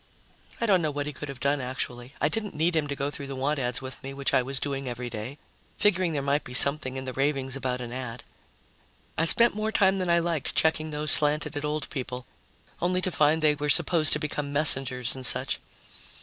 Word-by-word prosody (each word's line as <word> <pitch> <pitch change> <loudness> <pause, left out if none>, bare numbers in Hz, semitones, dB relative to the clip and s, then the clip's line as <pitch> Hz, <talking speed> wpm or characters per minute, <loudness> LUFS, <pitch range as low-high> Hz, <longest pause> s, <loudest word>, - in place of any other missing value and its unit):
I 235 - 0
don't 190 -5 +3
know 155 - 0
what 145 0 -4
he 150 - -5
could 150 +1 -7
have 135 -2 -8
done, 140 +2 0
actually. 125 0 -5
I 150 - +2
didn't 210 +6 -4
need 165 +3 +1
him 155 -2 0
to 140 - -4
go 140 +1 -3
through 140 -1 -7
the 135 - -6
want 140 +3 -1
ads 125 0 -3
with 130 0 -8
me, 135 0 -8
which 140 0 -2
I - - +4
was 135 +1 -3
doing 135 -2 -4
every 120 0 -6
day, 115 +6 -6 0.4
figuring 185 -4 +2
there 140 -2 -2
might 140 +2 0
be 125 - -7
something 135 -1 +2
in 130 - -6
the 130 - -5
ravings 135 -1 -1
about 130 -2 -3
an 120 -1 -6
ad. 125 -2 -6 0.9
I 165 - +1
spent 235 +8 +7
more 215 +1 -2
time 195 -2 +2
than 185 -1 -2
I 170 - +4
liked 170 -4 -2
checking 155 0 +1
those 150 0 +2
slanted 150 +1 +5
at 145 - -4
old 150 0 -3
people, 125 -2 -5 0.6
only 180 +1 +1
to 185 0 -1
find 155 0 +2
they 150 -1 +4
were 150 0 -4
supposed 160 0 +2
to 150 - 0
become 150 -2 -3
messengers 135 -4 +3
and 130 - -8
such. - - +1
145 Hz, 230 wpm, -26 LUFS, 130-155 Hz, 0.9 s, spent